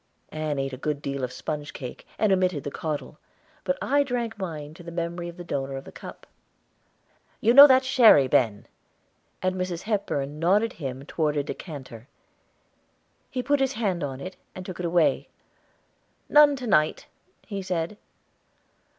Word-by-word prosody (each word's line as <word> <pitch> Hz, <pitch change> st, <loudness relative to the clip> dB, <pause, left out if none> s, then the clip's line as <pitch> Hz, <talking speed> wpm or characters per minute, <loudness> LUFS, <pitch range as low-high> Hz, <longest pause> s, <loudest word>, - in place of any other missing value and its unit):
Ann 155 Hz, -2 st, -2 dB
ate 135 Hz, 0 st, -2 dB
a -, -, -5 dB
good 145 Hz, +2 st, -2 dB
deal 140 Hz, -2 st, -4 dB
of 125 Hz, -, -2 dB
sponge 145 Hz, +3 st, -5 dB
cake, 125 Hz, -2 st, -8 dB
and 215 Hz, -2 st, +2 dB
omitted 185 Hz, -6 st, +1 dB
the 145 Hz, -, -4 dB
caudle, 150 Hz, 0 st, -5 dB, 0.4 s
but 275 Hz, -, 0 dB
I 285 Hz, +1 st, +3 dB
drank 245 Hz, -4 st, -2 dB
mine 155 Hz, -7 st, -6 dB
to 175 Hz, -, -13 dB
the 170 Hz, -, -9 dB
memory 170 Hz, +1 st, -3 dB
of 170 Hz, -, -12 dB
the 175 Hz, -, -7 dB
donor 135 Hz, -4 st, -3 dB
of 135 Hz, -, -7 dB
the -, -, -12 dB
cup. -, -, -11 dB, 1.1 s
"You 230 Hz, -, +3 dB
know 280 Hz, +3 st, +12 dB
that 260 Hz, -1 st, +5 dB
sherry, 235 Hz, -, +6 dB
Ben," 110 Hz, -5 st, +1 dB, 0.8 s
and 185 Hz, 0 st, +1 dB
Mrs. 185 Hz, -2 st, -3 dB
Hepburn 150 Hz, -9 st, -2 dB
nodded 200 Hz, +7 st, +2 dB
him 135 Hz, -3 st, -6 dB
toward 150 Hz, -1 st, -1 dB
a 145 Hz, -, +1 dB
decanter. 135 Hz, -7 st, -8 dB, 1.2 s
He 255 Hz, -2 st, -3 dB
put 285 Hz, +1 st, +2 dB
his 270 Hz, 0 st, +1 dB
hand 195 Hz, -, -1 dB
on 135 Hz, -2 st, -4 dB
it, 185 Hz, +6 st, -8 dB, 0.2 s
and 185 Hz, -, -7 dB
took 185 Hz, -1 st, -7 dB
it 175 Hz, -, -1 dB
away. 170 Hz, -1 st, +2 dB, 1.0 s
"None 295 Hz, -1 st, +7 dB
to 255 Hz, -2 st, -6 dB
night," 155 Hz, -9 st, +2 dB, 0.4 s
he 200 Hz, -3 st, -5 dB
said. 180 Hz, 0 st, -2 dB
170 Hz, 165 wpm, -26 LUFS, 145-210 Hz, 1.2 s, know